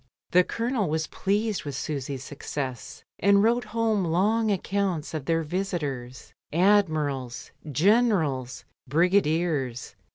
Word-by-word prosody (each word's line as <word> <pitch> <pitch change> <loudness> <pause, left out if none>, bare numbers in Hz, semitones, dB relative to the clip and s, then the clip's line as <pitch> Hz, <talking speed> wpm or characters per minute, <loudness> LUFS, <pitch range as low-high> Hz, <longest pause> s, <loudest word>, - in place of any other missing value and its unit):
The 180 +1 +6
Colonel 230 -3 -1
was 160 +1 0
pleased 205 +3 -1
with 145 -3 -5
Susy's 140 -2 -4
success, 135 -3 -6 0.2
and 200 0 +4
wrote 240 +2 +2
home 225 -3 0
long 210 +7 +2
accounts 195 -5 -1
of 155 -4 -4
their 165 +1 +1
visitors 150 -8 -4
— - - -52
admirals, 155 -9 +1 0.2
generals, 160 - +2 0.2
brigadiers. 160 -6 +1
170 Hz, 110 wpm, -26 LUFS, 145-200 Hz, 0.2 s, The